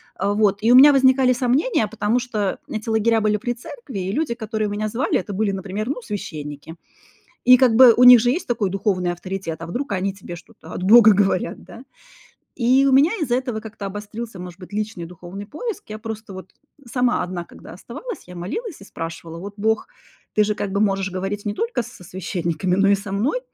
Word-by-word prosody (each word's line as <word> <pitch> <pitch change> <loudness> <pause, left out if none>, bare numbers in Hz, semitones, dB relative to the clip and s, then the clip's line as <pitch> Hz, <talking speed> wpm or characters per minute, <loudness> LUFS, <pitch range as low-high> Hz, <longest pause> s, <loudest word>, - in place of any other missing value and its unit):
А 200 +2 -1
вот, 205 -2 +2
и 230 +2 +3
у - - +7
меня 280 +3 +9
возникали 260 -1 +4
сомнения, 250 - +1
потому 220 +2 0
что 215 -6 -2
эти 215 0 -5
лагеря 225 0 +2
были 210 0 +2
при 240 +3 -3
церкви 240 -2 -9
и 185 +1 -3
люди, 290 -1 -1
которые 220 -2 -3
меня 210 +1 -3
звали, 240 +5 0
это 205 - -7
были, 200 +1 0
например, 195 +3 -4
ну, 275 -3 -3
священники. 155 -8 -7 0.7
И 255 0 +8
как 245 -3 +4
бы 245 -1 +9
у 245 - +3
них 245 -2 +10
же 240 - +2
есть 335 +8 -1
такой 215 -5 0
духовный 185 -2 -1
авторитет, 175 -2 -6
а 165 - -6
вдруг 245 +8 -4
они 195 0 -1
тебе 185 -3 -9
что-то 160 -1 -15
от - - -5
бога 220 +2 +8
говорят, 190 -3 0
да? 240 - -12 0.7
И 260 +3 +3
у 270 - +3
меня 285 +8 +5
из-за 245 -4 0
этого 250 -4 -3
как-то 215 -2 -8
обострился 205 +2 -7
может 180 0 -9
быть 180 - -12
личный 210 -5 -4
духовный 180 +3 -9
поиск. 420 - -6
Я 215 0 -6
просто 220 -3 -7
вот 190 0 -10 0.3
сама 250 0 +1
одна 175 -1 -5
когда - - -13
оставалась, 295 - -8
я 180 - -11
молилась 310 - -5
и - - -11
спрашивала: 165 -2 -7
"Вот, 200 +3 -8
бог, 220 +1 0 0.5
ты 210 - +4
же 210 0 -1
как 200 -1 -4
бы 200 - 0
можешь 195 -2 +1
говорить 195 +3 -4
не 205 - -1
только 460 - -2
с - - -11
со 180 - -14
священниками, 180 -1 -2
но 195 +1 +3
и 200 - +5
со 200 0 -5
мной? 245 - 0
210 Hz, 210 wpm, -21 LUFS, 190-240 Hz, 0.7 s, них